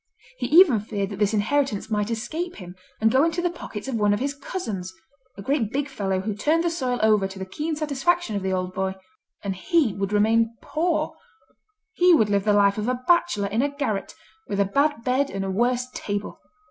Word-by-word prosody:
He - - -1
even 320 - +6
feared 205 -1 -3
that 200 - -6
this 205 -1 +2
inheritance 220 -1 0
might 210 0 0
escape 320 +10 -3
him, 180 -2 -10 0.2
and 220 0 +3
go 265 +4 +4
into 330 +1 0
the 350 0 0
pockets 220 -9 -8
of 265 - -3
one 210 -2 +2
of - - -4
his 280 +2 -1
cousins, 225 - -5 0.5
a 200 - -8
great 250 -3 0
big 285 +1 -1
fellow 195 -8 -2
who 210 +2 -2
turned 310 +11 +1
the 340 - +1
soil 255 -7 -1
over 210 -3 +4
to 195 0 -11
the 190 - -5
keen 300 +12 -3
satisfaction 305 -1 0
of 200 - -1
the 190 0 -1
old 185 0 -2
boy. 190 0 -2 0.5
And 195 -2 -2
he 295 - +1
would 195 0 -3
remain 225 +2 +2
poor; 330 +1 -1 0.8
he 360 -3 +5
would 215 -8 +2
live 200 0 +1
the 210 - +4
life 200 0 +3
of 210 - -2
a 250 0 -2
bachelor 345 - +2
in 220 +4 +1
a 285 - +1
garret, 275 -8 -3 0.3
with 200 - -2
a 200 - +4
bad 280 +4 +1
bed 265 +3 +1
and 195 0 -3
a 190 - -2
worse 245 +5 +1
table. 205 0 -4
225 Hz, 215 wpm, -24 LUFS, 200-290 Hz, 0.8 s, even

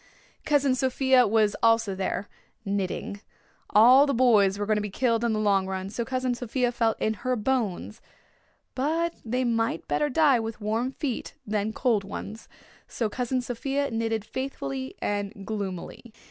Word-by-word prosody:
Cousin 285 -3 +3
Sophia 260 0 +3
was 215 -1 +2
also 225 -3 +3
there, 190 +1 -3 0.4
knitting. 200 0 -3 0.5
All 255 +7 +7
the 280 - 0
boys 210 -6 +4
were 205 - -2
going 215 0 +1
to - - 0
be 210 - -4
killed 230 +2 0
in 235 - +1
the 215 - 0
long 200 -3 +2
run, 190 0 -4
so 235 +3 -2
Cousin 255 +1 -1
Sophia 245 +1 -1
felt 230 -2 0
in 220 - +1
her 255 0 0
bones, 225 -3 -2 0.7
but 325 +5 0
they 250 +3 -1
might 230 -1 -1
better 295 - +1
die 285 -3 +4
with 225 -1 -5
warm 225 +4 -1
feet 270 -3 -4
than 210 0 -1
cold 225 -3 +1
ones, 210 +3 -8 0.4
so 225 -3 -2
Cousin 250 +3 -1
Sophia 270 +3 -2
knitted 225 -2 -1
faithfully 135 - -5
and 205 -1 -3
gloomily. 205 +2 -5
225 Hz, 160 wpm, -26 LUFS, 205-255 Hz, 0.7 s, All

